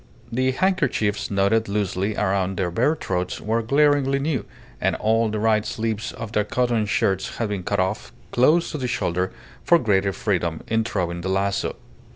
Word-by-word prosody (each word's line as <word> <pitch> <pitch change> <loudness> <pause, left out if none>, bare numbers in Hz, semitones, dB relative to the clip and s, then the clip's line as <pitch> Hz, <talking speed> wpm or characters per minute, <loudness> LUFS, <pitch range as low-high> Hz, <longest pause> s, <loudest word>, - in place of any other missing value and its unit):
The 130 +2 +1
handkerchiefs 140 - 0
knotted 100 +2 +2
loosely 100 0 -1
around 95 -2 0
their 90 -2 -1
bare 125 - +2
throats 90 - -3
were 115 +2 0
glaringly 140 +2 +3
new, 140 -5 -1 0.4
and - - +1
all 110 +1 +2
the 105 - -2
right 110 0 +2
sleeves 110 -1 -3
of 115 -2 -7
their 105 -2 +2
cotton 120 -1 0
shirts 95 -1 0
had 115 -3 -1
been 100 -2 -2
cut 100 +2 -1
off 95 +4 -1 0.2
close 155 +8 +3
to 150 - -4
the 125 - -2
shoulder 90 -6 -1 0.3
for 170 - +5
greater 100 - +2
freedom 90 -5 -1
in 110 0 +1
throwing 90 -6 -2
the 95 - -3
lazo. 100 +1 0
105 Hz, 175 wpm, -23 LUFS, 95-120 Hz, 0.4 s, for